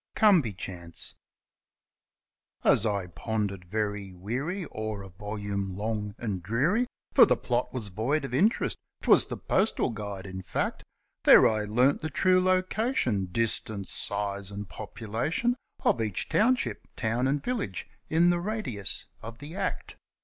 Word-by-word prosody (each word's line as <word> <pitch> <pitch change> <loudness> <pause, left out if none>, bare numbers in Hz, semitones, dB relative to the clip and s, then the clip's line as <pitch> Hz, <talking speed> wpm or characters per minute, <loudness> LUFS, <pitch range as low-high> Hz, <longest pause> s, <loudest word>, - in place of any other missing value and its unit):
Come 205 -6 +6
by 120 - -3
Chance 90 -3 -7 1.5
As 110 - +4
I 100 -3 0
pondered 100 +1 -3
very 105 0 -2
weary 135 - -3
o'er 110 -2 -4
a 95 - -10
volume 100 0 -4
long 105 -1 -2
and 105 -6 -3
dreary 145 - +1 0.3
For - - +8
the - - +3
plot 125 0 -1
was 115 -6 -2
void 125 +10 0
of 125 - -7
interest 200 - +2 0.2
'twas - - +6
the - - -5
Postal 190 - +1
Guide, 100 -3 -5
in 95 -1 -6
fact, 90 - -2 0.4
There - - +9
I 110 -1 0
learnt 125 +6 +3
the 155 - -2
true 185 +5 +4
location, 185 - +1
distance, 110 -1 -1
size, 100 -1 -1
and 100 0 -6
population 115 - -2 0.3
Of 120 - +3
each 105 -4 -2
township, 250 +4 +1
town, 115 +3 0
and 140 +1 0
village 225 - -2 0.2
in 170 +2 +5
the 175 - +1
radius 130 - -3 0.2
of 115 +1 -8
the 145 +5 -9
Act. - - -3
110 Hz, 145 wpm, -28 LUFS, 100-155 Hz, 1.5 s, There